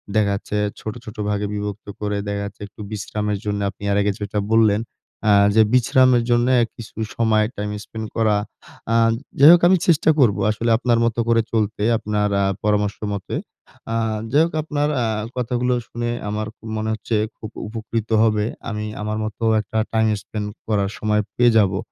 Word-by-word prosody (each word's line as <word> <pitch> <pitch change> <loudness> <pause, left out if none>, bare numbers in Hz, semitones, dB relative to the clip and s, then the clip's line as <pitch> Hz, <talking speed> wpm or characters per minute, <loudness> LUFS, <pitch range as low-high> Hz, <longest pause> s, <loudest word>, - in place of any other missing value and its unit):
দেখা 105 -2 +3
যাচ্ছে, 105 +1 -4 0.2
ছোট, 110 - -5
ছোট 110 - -9
ভাগে 105 0 -1
বিভক্ত 105 0 -5
করে 105 -1 -1
দেখা 100 0 -2
যাচ্ছে 100 0 -10
একটু 105 - -13
বিশ্রামের 105 0 -2
জন্য 100 0 -1
আপনি 100 +1 -13
আর 100 - +2
আগে 100 0 +1
যেটা 105 0 -2
বললেন 110 -1 +4 0.5
আ - - +6 0.2
যে 110 - +7
বিশ্রামের 125 0 +4
জন্য 120 +1 +3 0.3
কিছু 115 -1 -11 0.2
সময় 110 -2 +3
টাইম 105 0 -3
স্পেন্ড 110 0 -7
করা। 110 -2 +3 0.6
আ - - +3 0.4
যাই 145 +3 +9
হোক 175 - +5
আমি 185 - +5
চেষ্টা 160 -1 +4
করবো। 110 -7 +4
আসলে 115 +2 -2
আপনার 120 -1 +1
মত 115 - 0
করে 115 0 +4
চলতে। 105 -1 0
আপনার 105 -1 -1
আ - - +2 0.2
পরামর্শমতে। 105 -1 -1 0.6
আ - - 0 0.4
যাই 150 +3 +5
হোক 170 - -6
আপনার 145 -1 -1
আ - - +1 0.3
কথাগুলো 125 0 0
শুনে 120 0 -3 0.2
আমার 105 +1 -2
খু - - -40
মনে 110 0 -2
হচ্ছে 110 +1 -3 0.2
খুব 110 - -8 0.2
উপকৃত 110 0 -4
হবে। 105 -1 +2 0.2
আমি 105 -1 -3 0.2
আমার 105 +1 -2
মতো 110 +2 -6 0.2
একটা 105 +2 -5 0.2
টাইম 110 0 +3
স্পেন্ড 105 -1 -5 0.2
করার 100 -3 +1
সময় 105 0 +1
পেয়ে 120 -1 +5
যাবো। 95 -3 +3
110 Hz, 175 wpm, -21 LUFS, 105-115 Hz, 0.6 s, যাই